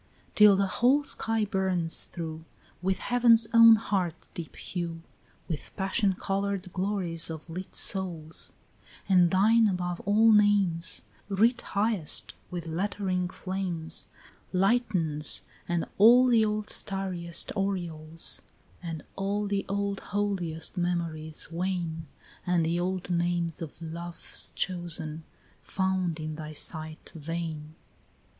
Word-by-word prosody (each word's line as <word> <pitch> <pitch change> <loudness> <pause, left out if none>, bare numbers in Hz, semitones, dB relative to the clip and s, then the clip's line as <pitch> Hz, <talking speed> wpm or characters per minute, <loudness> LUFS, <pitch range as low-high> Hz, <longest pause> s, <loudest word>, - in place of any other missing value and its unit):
14 - - -33
Till 210 -2 +7
the 195 +1 +2
whole 250 +9 +3
sky 225 -5 -1
burns 190 -4 0
through 160 -2 -6 0.4
With 190 +1 +1
heaven's 235 -1 +5
own 230 -1 +9
heart 190 -6 -2
deep 165 -3 -7
hue, 170 -2 -5 0.4
With 160 -4 -5
passion 195 0 +1
coloured 195 -1 -2
glories 185 -4 -1
of 160 +1 -7
lit 185 +3 -7
souls; 170 -5 -2 0.6
And 180 -3 +5
thine 220 +5 +5
above 180 -2 -2
all 215 +3 +4
names 205 -5 +3 0.3
Writ 225 +5 +3
highest 200 -6 0 0.2
with 175 -2 -5
lettering 185 +1 -1
flames 185 -4 -3 0.4
Lightens, 185 -7 +2 0.2
and 175 -1 0
all 240 +5 +8
the 235 -3 +4
old 210 0 -1
starriest 185 -4 -1
aureoles 170 -5 -1 0.4
And 165 -3 -5
all 200 +2 -1
the 200 -1 -2
old 200 0 -1
holiest 190 -4 -2
memories 165 -3 -2
wane, 170 -2 -3 0.4
And 175 -2 +2
the 170 +2 0
old 180 0 -2
names 175 0 0
of 160 -2 -7
love's 170 +1 -6
chosen, 165 -3 -3 0.4
found 185 -3 -1
in 155 0 -5
thy 155 -1 -7
sight 155 +1 -3
vain. 160 -1 -5
180 Hz, 120 wpm, -28 LUFS, 165-200 Hz, 0.6 s, own